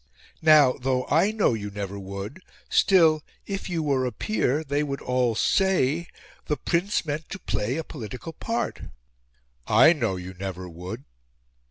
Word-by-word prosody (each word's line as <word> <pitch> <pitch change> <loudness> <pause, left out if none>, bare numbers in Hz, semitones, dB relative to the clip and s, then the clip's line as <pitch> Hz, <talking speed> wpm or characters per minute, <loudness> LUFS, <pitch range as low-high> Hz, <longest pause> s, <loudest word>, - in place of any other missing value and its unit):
Now, 150 -5 +6
though 130 0 0
I 165 +7 +4
know 215 - +2
you 105 -2 -4
never 100 -1 -5
would, 100 - -7 0.3
still, 165 -5 +5 0.2
if 195 -1 -4
you 165 -3 -1
were 135 -3 +1
a - - -3
Peer, 155 - 0
they 145 0 -1
would 140 -2 -3
all 125 -2 0
say, 170 - +2 0.4
the 150 - 0
Prince 175 +6 0
meant 150 +1 -4
to - - -5
play 120 - -2
a 165 - -2
political 130 +3 -8
part. 230 +8 -3 0.9
I 160 - +7
know 115 - -1
you 90 0 -7
never 95 -1 -6
would!" 90 +2 -7
140 Hz, 155 wpm, -25 LUFS, 105-165 Hz, 0.9 s, I